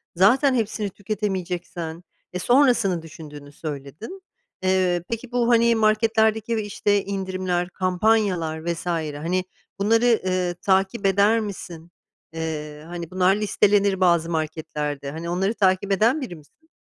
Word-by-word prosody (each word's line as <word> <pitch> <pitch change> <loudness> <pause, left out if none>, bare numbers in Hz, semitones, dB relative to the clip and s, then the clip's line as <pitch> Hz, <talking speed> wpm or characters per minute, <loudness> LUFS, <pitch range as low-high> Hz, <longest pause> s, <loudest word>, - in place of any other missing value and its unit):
zaten 255 - +4
hepsini 215 -2 -1
tüketemeyeceksen 180 -5 -4 0.3
e, 180 - -3
sonrasını 240 - +3
düşündüğünü 150 -3 -11
söyledin. 150 - -8 0.4
Eee, 185 -2 +2
peki, 230 +1 -5
bu, 245 -1 +1
hani, 235 0 +4
marketlerdeki 220 +1 +2
ve 215 - -1
işte 205 -1 0
indirimler, 185 -2 -2
kampanyalar 185 -4 0
vs. 170 0 -3
hani, 165 +2 -1 0.4
bunları, 225 +3 +3
ııı, 180 -1 0
takip 195 +2 +1
eder 200 +4 +4
misin? 175 -5 -7 0.4
Eee, 150 -2 -5
hani, 170 0 -7
bunlar 185 +1 +3
listelenir 205 -2 +2
bazı 170 -2 +3
marketlerde. 150 -3 -3
Hani, 165 +2 -6
onları 190 +5 0
takip 195 -1 +1
eden 230 +10 +3
biri 205 -9 -6
misin? 240 - -20
185 Hz, 125 wpm, -23 LUFS, 170-215 Hz, 0.4 s, zaten